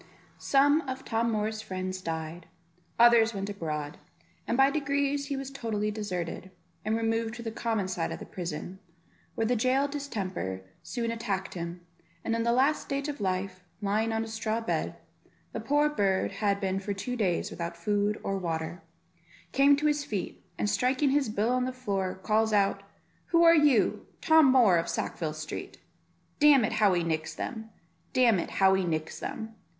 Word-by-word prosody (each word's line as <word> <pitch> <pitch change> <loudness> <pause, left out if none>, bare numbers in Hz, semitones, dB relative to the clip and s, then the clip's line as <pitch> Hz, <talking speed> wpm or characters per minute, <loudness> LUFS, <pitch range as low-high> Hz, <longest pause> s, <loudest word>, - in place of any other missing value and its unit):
Some 285 +3 +4
of 260 +1 -5
Tom 230 0 0
Moor's 215 0 -1
friends 185 -2 -4
died, 165 0 -5 0.5
others 230 -2 +6
went 195 +1 -3
abroad, 150 -6 -4 0.5
and 235 - 0
by 270 +1 +5
degrees 280 -1 0
he 280 -1 -2
was 270 0 -5
totally 215 -6 -2
deserted, 185 -4 -4 0.3
and 215 +1 0
removed 225 0 -1
to 235 - -8
the 225 - -4
common 220 -3 -1
side 175 -3 -2
of - - -4
the - - -9
prison, 180 +1 -6 0.6
where 225 - 0
the 245 +2 +2
jail 255 +5 +2
distemper 195 - -4 0.2
soon 235 -2 -3
attacked 205 -5 -3
him; 175 0 -6 0.4
and 230 - 0
in 230 - 0
the 235 +1 +2
last 270 +5 +3
stage 280 +1 -3
of 285 -6 -5
life, 185 -1 -2 0.2
lying 215 +2 0
on 225 0 0
a - - -6
straw 220 0 -2
bed; 225 - -2 0.6
the - - -4
poor 295 +1 +2
bird 200 -10 +1
had 200 -2 0
been 190 -1 -1
for 200 +1 -3
two 250 +6 -4
days 190 -7 0
without 170 0 -5
food 205 +3 0
or 195 0 -1
water, 165 0 -3 0.7
came 280 +1 +5
to 295 +2 -2
his 295 -1 +2
feet, 205 -9 -5
and - - 0
striking 260 +5 +2
his 280 -4 +2
bill 215 +2 0
on 250 0 +1
the 255 - -2
floor, 200 -7 -2
calls 220 +3 +1
out, 200 -1 +2 0.5
"Who 335 0 +4
are 335 0 +8
you? 295 -8 +3
Tom 315 -4 +6
Moor 230 -9 +5
of 170 +1 -1
Sackville 155 -2 -3
Street; 155 0 -6 0.6
damn 290 -5 +6
it, - - -2
how 210 -3 +4
he 175 -1 +1
nicks 160 -1 -2
them, 220 -3 -5 0.4
damn 240 -6 +4
it, - - -3
how 190 0 +4
he 190 0 +2
nicks 160 -2 -3
them. 220 0 -5
220 Hz, 180 wpm, -29 LUFS, 190-255 Hz, 0.7 s, are